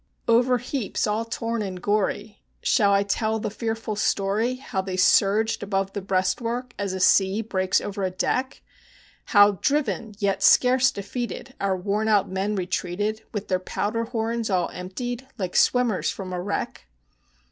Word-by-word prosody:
Over 245 +2 +4
heaps 245 -2 -2
all 215 +2 -1
torn 230 0 -3
and 190 -3 -4
gory 205 +1 -1 0.2
shall 205 -5 +3
I 200 0 +4
tell 220 +2 0
the 210 - -3
fearful 225 0 -3
story, 210 +4 0
How 255 -7 -3
they 190 -1 -5
surged 205 +4 +3
above 195 -1 -2
the 200 - -3
breastwork, 230 +6 -1
as 200 -2 -2
a 190 - -3
sea 195 +3 +3
breaks 190 -3 +1
over 200 0 -5
a 185 - +1
deck; 255 +8 -2 0.6
How, 205 -3 +5
driven, 230 -7 0
yet 200 -2 0
scarce 255 +5 +5
defeated, 240 +5 -5
our 195 -1 +1
worn 205 +4 -1
out 210 -3 +3
men 195 +2 -2
retreated, 190 +3 -2
With 210 -2 -4
their 185 -1 +1
powder 215 +5 -2
horns 230 -1 -2
all 180 -3 +1
emptied, 245 +8 -6
like 185 -4 -3
the - - +3
swimmers 245 -6 +2
from 185 -2 -5
a 180 - -2
wreck? 180 - -4
205 Hz, 160 wpm, -24 LUFS, 195-230 Hz, 0.6 s, How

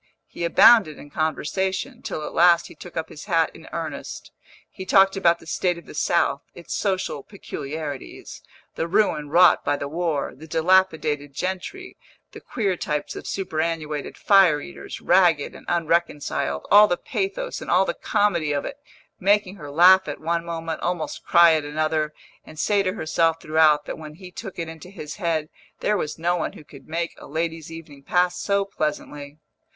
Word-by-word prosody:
He - - -8
abounded 190 -1 +6
in 145 - -13
conversation, 190 - -2
till 155 - -5
at - - -7
last 170 0 +5
he - - -11
took 180 - -11
up 160 - -3
his 150 - -10
hat 165 -5 +2
in - - -14
earnest; - - -6 0.4
he 190 - -9
talked 195 +1 +4
about 170 -3 +3
the - - -17
state 175 +2 -1
of 170 - -12
the - - -11
South, - - +1
its - - -8
social 190 -7 -1
peculiarities, 150 -5 -7 0.3
the 165 - -3
ruin 165 -6 +1
wrought 175 +3 +5
by 145 0 0
the 140 - -4
war, 160 -2 -2
the 155 +4 -13
dilapidated 160 -4 +1
gentry, 190 - -5 0.3
the - - -11
queer 200 -5 -1
types 150 -3 -3
of - - -8
superannuated 160 -5 -3
fire 190 -7 +5
eaters, 175 +4 -9
ragged 175 -5 +3
and - - -14
unreconciled, 165 - -1
all 210 +1 +8
the 175 - 0
pathos - - -3
and - - -7
all - - +4
the - - -1
comedy 170 - 0
of 145 - -2
it, 275 - -6 0.4
making 200 0 +2
her 145 -4 -9
laugh 185 +5 +6
at - - -5
one 170 +1 -1
moment, 165 -1 -5
almost 175 -3 -3
cry 170 -1 +6
at 155 -1 +1
another, 155 +1 -1 0.3
and 155 - -14
say 205 +5 +2
to 185 -1 -1
herself 165 -3 0
throughout 155 -1 +3
that - - -6
when 155 -1 -9
he 180 +1 -12
took 195 +1 -8
it 165 -1 -3
into 160 +2 -10
his 155 -6 -8
head 165 -5 -1 0.3
there 210 - +1
was 155 -6 -3
no 175 +2 +1
one 175 - -3
who - - -13
could 140 -2 -15
make 170 +1 -3
a - - -11
lady's 160 +1 -3
evening 155 -4 -11
pass 180 +5 +1
so 200 0 +1
pleasantly. 150 -4 -4
165 Hz, 180 wpm, -23 LUFS, 155-190 Hz, 0.4 s, all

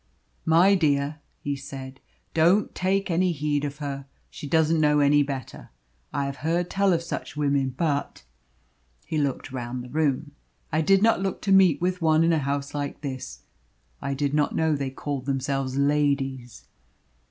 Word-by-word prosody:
"My 170 +5 +6
dear," 150 -4 +1 0.2
he 145 0 -1
said, 135 -1 -8 0.3
"don't 175 +6 +3
take 190 0 0
any 180 +2 +2
heed 145 -1 -1
of 145 0 -4
her. 140 -2 -5 0.2
She 145 - -8
doesn't 160 +1 +3
know 150 -1 +4
any 145 0 +5
better. 135 -3 -5 0.4
I 140 -1 -1
have 140 0 -4
heard 170 +3 -1
tell 195 0 +2
of 170 -1 +1
such 165 - -6
women, 140 -3 0
but" 145 - -1 0.8
he 155 - -2
looked 140 -2 -2
round 125 -1 -5
the 125 - -10
room 150 -1 0 0.4
"I 160 0 +2
did 195 +5 +4
not 225 -3 +4
look 195 -1 -2
to 200 - 0
meet 185 -6 +5
with 180 0 -1
one 160 0 +4
in 165 0 +3
a 160 - +2
house 140 0 -2
like 145 -1 -4
this. 130 - -6 0.6
I 140 0 -2
did 140 0 -1
not 150 -1 +1
know 160 -1 +2
they 140 -2 -2
called 135 0 -5
themselves 135 -1 -1
ladies." 140 -4 0
145 Hz, 170 wpm, -25 LUFS, 140-165 Hz, 0.8 s, My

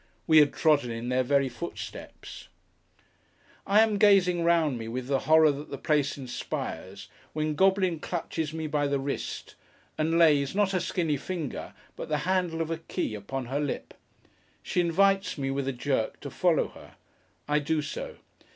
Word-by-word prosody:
We 160 -2 +6
had 145 -2 +5
trodden 150 -6 +2
in 115 +1 -4
their 125 0 +2
very 140 +1 +2
footsteps. 130 +8 -8 1.2
I 205 +2 +6
am 215 -2 +2
gazing 185 -4 +4
round 165 -7 +2
me, 115 - -6
with 125 +2 -4
the 135 +1 +1
horror 160 -1 +7
that 145 +2 -7
the 140 - -5
place 145 0 0
inspires, 100 -6 -6 0.3
when 155 0 -1
Goblin 190 0 +2
clutches 160 -2 -3
me 160 0 -4
by 150 -1 0
the 140 0 0
wrist, 135 +1 -4 0.5
and 160 +2 +1
lays, 150 -3 +4
not 205 -2 +2
her 185 - +1
skinny 165 -4 -1
finger, 160 -1 -5 0.2
but - - -7
the 150 - +1
handle 180 -3 0
of 160 - -6
a 165 - -2
key, 165 - -3
upon 120 +6 -5
her 135 +4 -2
lip. 145 -2 -4 0.7
She 180 - 0
invites 195 +3 +2
me, 135 -1 -2
with 135 0 -2
a - - +1
jerk, 125 -2 -2
to - - -7
follow - - +2
her. - - -15 0.5
I 150 0 +2
do 150 +1 -1
so. 145 - -6
150 Hz, 170 wpm, -28 LUFS, 135-170 Hz, 1.2 s, horror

